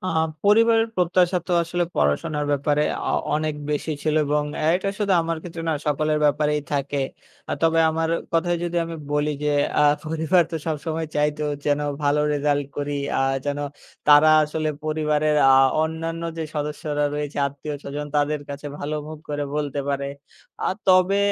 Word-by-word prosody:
আ -, -, 0 dB, 0.4 s
পরিবারের 225 Hz, +2 st, +4 dB
প্রত্যাশা 180 Hz, 0 st, +2 dB
তো 180 Hz, -, -2 dB
আসলে 175 Hz, +1 st, -1 dB
পড়াশোনার 150 Hz, -, +1 dB
ব্যাপারে 145 Hz, +1 st, +1 dB, 0.3 s
আ -, -, 0 dB, 0.2 s
অনেক 155 Hz, 0 st, -1 dB, 0.2 s
বেশি 150 Hz, +1 st, -1 dB
ছিল 155 Hz, -1 st, 0 dB
এবং 150 Hz, +1 st, +1 dB, 0.3 s
এটা 190 Hz, +2 st, -1 dB
শুধু 205 Hz, -2 st, +1 dB
আমার 165 Hz, 0 st, -2 dB
ক্ষেত্রে 170 Hz, -1 st, -7 dB
না -, -, +2 dB
সকলের 150 Hz, +1 st, +1 dB
ব্যাপারেই 150 Hz, 0 st, +2 dB
থাকে। 140 Hz, 0 st, -1 dB, 0.5 s
আ -, -, 0 dB
তবে 165 Hz, 0 st, +4 dB
আমার 160 Hz, 0 st, -1 dB, 0.2 s
কথায় 175 Hz, +1 st, +1 dB
যদি 175 Hz, 0 st, -3 dB
আমি 165 Hz, 0 st, -6 dB, 0.2 s
বলি 150 Hz, +1 st, +1 dB
যে, 150 Hz, -, +2 dB, 0.3 s
আ -, -, +5 dB, 0.2 s
পরিবার 160 Hz, +3 st, +2 dB
তো -, -, 0 dB
সবসময় 160 Hz, +1 st, -2 dB
চাইতো 150 Hz, +1 st, 0 dB, 0.2 s
যেন 145 Hz, 0 st, +1 dB, 0.2 s
ভালো 145 Hz, +1 st, +2 dB
রেজাল্ট 145 Hz, -1 st, 0 dB
করি 145 Hz, 0 st, -2 dB, 0.3 s
আ -, -, +1 dB, 0.2 s
যেন 145 Hz, 0 st, -2 dB, 0.5 s
তারা 150 Hz, +1 st, +7 dB, 0.2 s
আসলে 155 Hz, +1 st, -2 dB, 0.2 s
পরিবারের 155 Hz, -1 st, +1 dB
আ -, -, +8 dB, 0.3 s
অন্যান্য 165 Hz, +1 st, -3 dB, 0.2 s
যে 160 Hz, -, -2 dB
সদস্যরা 150 Hz, 0 st, -2 dB
রয়েছে, 150 Hz, -1 st, -4 dB
আত্মীয়স্বজন 145 Hz, +1 st, -6 dB
তাদের 145 Hz, 0 st, +1 dB
কাছে 145 Hz, +1 st, -7 dB
ভালো 150 Hz, +2 st, -3 dB
মুখ 155 Hz, 0 st, -8 dB
করে 145 Hz, -1 st, -2 dB
বলতে 145 Hz, -2 st, -2 dB
পারে। 140 Hz, 0 st, -1 dB, 0.6 s
আ -, -, +1 dB, 0.2 s
তবে 185 Hz, +1 st, +5 dB
150 Hz, 160 wpm, -23 LUFS, 145-165 Hz, 0.6 s, আ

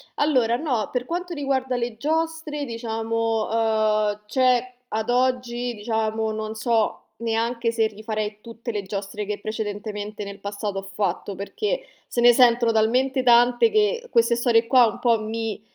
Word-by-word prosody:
allora, 250 Hz, -6 st, +2 dB
no, 250 Hz, -8 st, -1 dB
per 250 Hz, 0 st, -2 dB
quanto 350 Hz, +2 st, -4 dB
riguarda 265 Hz, -3 st, -1 dB
le 235 Hz, -2 st, -3 dB
giostre, 315 Hz, +1 st, -2 dB
diciamo, 225 Hz, -1 st, -2 dB
ehm, 215 Hz, -2 st, +1 dB
cioè, 255 Hz, +1 st, +2 dB, 0.2 s
ad 220 Hz, +2 st, -2 dB
oggi, 245 Hz, -1 st, 0 dB
diciamo, 220 Hz, 0 st, -1 dB
non 215 Hz, 0 st, -4 dB
so 220 Hz, 0 st, 0 dB, 0.2 s
neanche 230 Hz, +1 st, -1 dB
se 225 Hz, -1 st, +2 dB
rifarei 215 Hz, 0 st, -4 dB
tutte 235 Hz, +1 st, -7 dB
le 205 Hz, -, -1 dB
giostre 200 Hz, +1 st, -5 dB
che 210 Hz, 0 st, -4 dB
precedentemente 210 Hz, -1 st, -5 dB
nel 200 Hz, 0 st, -8 dB
passato 200 Hz, -1 st, -4 dB
ho -, -, -6 dB
fatto, 195 Hz, 0 st, -3 dB
perché 440 Hz, -, -3 dB, 0.2 s
se 240 Hz, -, -4 dB
ne 240 Hz, 0 st, +7 dB
sentono 235 Hz, -2 st, +4 dB
talmente 255 Hz, +4 st, +2 dB
tante 245 Hz, -, +5 dB
che 465 Hz, +3 st, +1 dB
queste 235 Hz, 0 st, +4 dB
storie 235 Hz, -1 st, +3 dB
qua 250 Hz, -3 st, +6 dB
un 215 Hz, -, -5 dB
po' 230 Hz, -3 st, +2 dB
mi 220 Hz, -1 st, -4 dB
230 Hz, 150 wpm, -24 LUFS, 215-250 Hz, 0.2 s, ne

